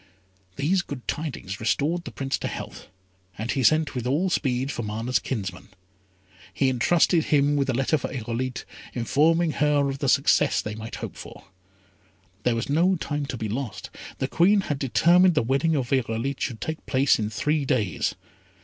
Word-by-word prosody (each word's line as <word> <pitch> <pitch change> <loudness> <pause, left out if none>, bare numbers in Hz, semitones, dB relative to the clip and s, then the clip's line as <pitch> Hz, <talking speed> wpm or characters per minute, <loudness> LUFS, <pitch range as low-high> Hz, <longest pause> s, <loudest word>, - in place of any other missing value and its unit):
These 175 - +1
good 140 -7 -8
tidings 130 - -4
restored 150 +10 0
the - - -6
Prince 135 -1 -2
to - - -3
health, - - -7 0.5
and 110 +3 -2
he 135 - 0
sent 155 +4 +3
with 125 -1 -3
all 165 +8 +1
speed 130 -3 0
for - - -4
Mana's 110 +3 -1
kinsman. 95 -6 -5 0.8
He 135 - +1
entrusted 160 +6 +3
him 145 0 +3
with 140 -1 0
a - - +2
letter 135 +4 +1
for - - -5
Irolite, 125 +1 -4 0.3
informing 160 +7 +2
her 145 -1 +2
of 135 0 -4
the 140 - 0
success - - +3
they 105 - -4
might 110 +1 -7
hope - - -7
for. - - -11 1.0
There 120 +1 +1
was 115 - -2
no 170 +6 +3
time 145 -3 -3
to 125 - -4
be 110 - -3
lost. 120 +2 -5 0.3
The - - -1
Queen 200 +4 +4
had 145 -7 -3
determined 175 +7 +4
the 150 - +3
wedding 135 +7 +1
of 130 -4 -2
Irolite 130 +1 -1
should 115 -5 -3
take 160 0 -4
place 135 -1 +3
in 105 -1 -1
three 150 +8 0
days. 100 - 0
135 Hz, 175 wpm, -25 LUFS, 120-155 Hz, 1.0 s, Queen